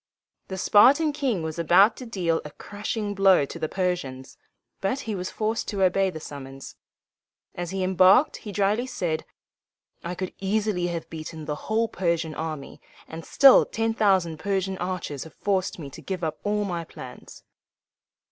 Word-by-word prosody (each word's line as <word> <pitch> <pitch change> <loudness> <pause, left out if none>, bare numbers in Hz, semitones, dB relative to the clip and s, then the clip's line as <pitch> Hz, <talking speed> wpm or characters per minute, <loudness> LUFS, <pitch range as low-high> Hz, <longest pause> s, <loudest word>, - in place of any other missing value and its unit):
The 190 - -5
Spartan 280 - +5
king 260 - -1
was 160 +1 -4
about 190 +7 +5
to 255 - -8
deal 175 -7 0
a 150 - -8
crushing 205 +5 -4
blow 195 -6 +4
to 165 - -9
the 155 -1 -2
Persians, 140 -9 -3 0.4
but 255 +8 -1
he 225 - -4
was 185 -2 -4
forced 220 +1 -2
to 200 -3 -1
obey 190 +1 +3
the 160 - -7
summons. 135 -3 -9 0.8
As 175 -1 -5
he 190 0 -2
embarked 190 - +5
he 210 - -8
dryly 205 +5 +1
said, 165 -10 -2 0.8
"I 175 +1 -4
could 185 0 -5
easily 200 -2 0
have 165 -2 -4
beaten 160 -1 -7
the 150 - -2 0.2
whole 225 +1 +2
Persian 170 -6 -1
army, 155 -3 -6 0.3
and 165 +1 -8
still 270 - +7
ten 225 0 -1
thousand 190 -7 +2
Persian 190 0 -1
archers 180 -6 -4
have 160 - -14
forced 190 -2 -1
me 145 -5 -8
to - - -11
give 185 -2 -5
up 155 -1 -3
all 210 0 0
my 175 -3 -3
plans." - - -12
185 Hz, 165 wpm, -25 LUFS, 165-205 Hz, 0.8 s, still